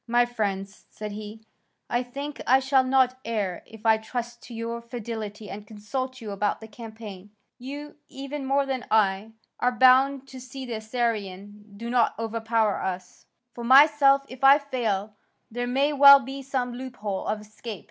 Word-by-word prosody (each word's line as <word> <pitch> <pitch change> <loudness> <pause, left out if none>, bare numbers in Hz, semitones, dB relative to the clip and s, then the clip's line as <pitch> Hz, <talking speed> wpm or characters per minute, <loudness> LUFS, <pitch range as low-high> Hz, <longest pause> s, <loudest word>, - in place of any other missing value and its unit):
"My 240 +1 +3
friends," 200 -4 -4
said 210 -1 -7
he, 210 +1 -8 0.5
"I 240 - 0
think 280 +4 -7
I 260 +2 +6
shall 265 0 +3
not 255 -1 +2
err 210 -6 -2
if 225 0 -14
I 220 -1 +5
trust 240 +1 -6
to 240 - -11
your 230 +1 -4
fidelity 220 -3 -6
and 205 +1 -8
consult 255 +5 -5
you 215 -2 -6
about 205 +1 -1
the 220 - -10
campaign. 215 -3 -10 0.3
You, 285 +4 -8
even 275 +1 -6
more 275 +1 +2
than 265 -2 -4
I, 210 0 +1 0.3
are 250 - +2
bound 260 +2 +4
to 260 -1 -10
see 260 +1 -8
that 245 - -8
the 225 - -2
Assyrians 215 -4 -3 0.2
do 230 +2 -6
not 245 -2 +2
overpower 225 -1 0
us. 185 -1 -6 0.3
For 235 - -8
myself, 275 +2 +6
if 255 +1 -11
I 275 +1 +8
fail, 225 -8 -2 0.4
there 245 +2 -3
may 275 +4 +1
well 280 0 +9
be 275 +1 -7
some 255 -2 -2
loophole 240 -6 -5
of 210 0 -1
escape. 215 0 -9
235 Hz, 170 wpm, -26 LUFS, 215-260 Hz, 0.5 s, well